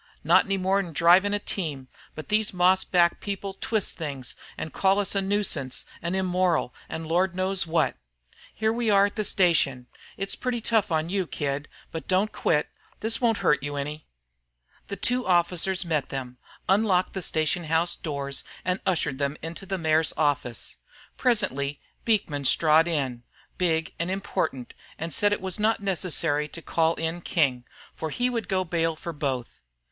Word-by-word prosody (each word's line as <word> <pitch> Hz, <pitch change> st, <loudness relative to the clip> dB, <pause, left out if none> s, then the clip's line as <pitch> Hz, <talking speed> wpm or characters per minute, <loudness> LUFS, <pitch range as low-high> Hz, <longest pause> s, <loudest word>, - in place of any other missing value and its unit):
Not -, -, +5 dB
any 195 Hz, -1 st, 0 dB
more 190 Hz, +1 st, +2 dB
'n 175 Hz, -4 st, -4 dB
drivin' 180 Hz, +6 st, +5 dB
a 205 Hz, -, +2 dB
team; 155 Hz, -10 st, -4 dB, 0.3 s
but 155 Hz, -, -8 dB
these 210 Hz, -2 st, +1 dB
moss 185 Hz, +1 st, +4 dB
backed 175 Hz, -2 st, +2 dB
people 200 Hz, -1 st, -4 dB
twist 215 Hz, -1 st, -2 dB
things 140 Hz, -6 st, -5 dB, 0.2 s
an' 160 Hz, -, -5 dB
call 195 Hz, 0 st, +3 dB
us 205 Hz, -1 st, 0 dB
'nuisances' 195 Hz, -9 st, 0 dB, 0.2 s
an' 175 Hz, +2 st, -2 dB
'immoral' 180 Hz, -7 st, +1 dB, 0.2 s
an' 160 Hz, +1 st, -4 dB
Lord 175 Hz, +3 st, +1 dB
knows 185 Hz, -1 st, 0 dB
what. 165 Hz, +1 st, +1 dB, 0.5 s
Here 220 Hz, 0 st, 0 dB
we 235 Hz, -1 st, 0 dB
are 200 Hz, -1 st, +6 dB
at 205 Hz, -, -4 dB
the 215 Hz, -, 0 dB
station, 165 Hz, -10 st, +2 dB, 0.3 s
it's 195 Hz, 0 st, -2 dB
pretty 250 Hz, -2 st, -2 dB
tough 220 Hz, -4 st, +1 dB
on 160 Hz, +1 st, 0 dB
you, 190 Hz, -2 st, -1 dB
kid, 145 Hz, 0 st, -3 dB, 0.2 s
but 160 Hz, -, -6 dB
don't 190 Hz, +3 st, +2 dB
quit. 150 Hz, -2 st, +1 dB, 0.3 s
This 225 Hz, +3 st, 0 dB
won't 230 Hz, -3 st, +3 dB
hurt 150 Hz, -, +4 dB
you 145 Hz, +1 st, -4 dB
any." 150 Hz, +2 st, -5 dB, 0.8 s
The 200 Hz, -, -4 dB
two 250 Hz, +6 st, 0 dB
officers 180 Hz, +1 st, +2 dB
met 155 Hz, -5 st, -1 dB
them, 125 Hz, -2 st, -6 dB, 0.3 s
unlocked 190 Hz, -2 st, +3 dB
the 190 Hz, -, -3 dB
station 160 Hz, +1 st, 0 dB
house 165 Hz, +2 st, +2 dB
doors, 140 Hz, -3 st, -4 dB, 0.2 s
and 180 Hz, +1 st, 0 dB
ushered 155 Hz, -7 st, 0 dB
them 140 Hz, +1 st, -1 dB
into 170 Hz, +4 st, -6 dB
the 190 Hz, 0 st, -1 dB
mayor's 160 Hz, -1 st, +2 dB
office. 145 Hz, -7 st, 0 dB, 0.4 s
Presently 145 Hz, -, 0 dB, 0.3 s
Beekman 165 Hz, -11 st, +1 dB
strode 155 Hz, +4 st, +4 dB
in, 135 Hz, -7 st, -1 dB, 0.4 s
big 165 Hz, -3 st, +1 dB
and 170 Hz, +1 st, -1 dB
important, 185 Hz, -9 st, -2 dB, 0.2 s
and 165 Hz, -1 st, -2 dB
said 205 Hz, +6 st, +3 dB
it 205 Hz, -, 0 dB
was 190 Hz, +1 st, -2 dB
not 220 Hz, +1 st, +2 dB
necessary 170 Hz, -6 st, 0 dB
to 165 Hz, -, -10 dB
call 165 Hz, 0 st, +2 dB
in 165 Hz, +2 st, -3 dB
King, 135 Hz, -8 st, +1 dB, 0.3 s
for 160 Hz, -, -4 dB
he 245 Hz, +10 st, 0 dB
would 230 Hz, -3 st, -2 dB
go 185 Hz, -1 st, +2 dB
bail 165 Hz, -2 st, 0 dB
for 170 Hz, +2 st, -6 dB
both. 135 Hz, -5 st, -3 dB
170 Hz, 170 wpm, -26 LUFS, 150-195 Hz, 0.8 s, are